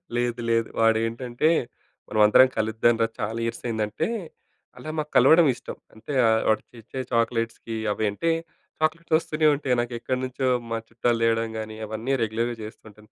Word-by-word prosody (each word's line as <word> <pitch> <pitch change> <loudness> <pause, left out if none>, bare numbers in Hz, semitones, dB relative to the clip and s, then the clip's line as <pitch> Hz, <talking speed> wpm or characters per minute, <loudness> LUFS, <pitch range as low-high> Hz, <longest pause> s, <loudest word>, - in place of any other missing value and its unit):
లేదు. 120 0 -1
లేదు. 115 0 +2
వాడేంటంటే 115 +5 +1 0.6
"మనం 110 - -2
అందరం 130 +5 +7
కలుద్దాం 110 +2 +2
రా! 115 - +3
చాలా 110 +2 -2
ఇయర్స్ 115 0 -4
అయిందంటే", 110 -2 -1 0.7
అలా 155 - -8
మాకు 150 0 -4
కలవడం 160 -1 +6
ఇష్టం. - - -9 0.2
అంటే 125 +6 -7 0.3
వాడు 110 - +3
తెచ్చే 120 +3 -7
చాక్లెట్స్‌కి 115 -1 -1 0.2
అవి 110 - -2
అంటే 165 +11 0 0.5
చాక్లెట్స్ 160 +1 +1
ఓస్తూనే 155 -1 +1
ఉంటాయి. 135 -3 0
నాకెక్కడ్నుంచో 130 +2 -2 0.2
మా 115 - 0
చుట్టాలు 115 0 0
తేవడం 115 0 +1
గాని 110 0 -6
అవన్నీ 110 +5 -3
రెగ్యులర్‌గా 115 +2 -1
చేస్తూంటాను. 110 0 -13
115 Hz, 140 wpm, -25 LUFS, 110-130 Hz, 0.7 s, అందరం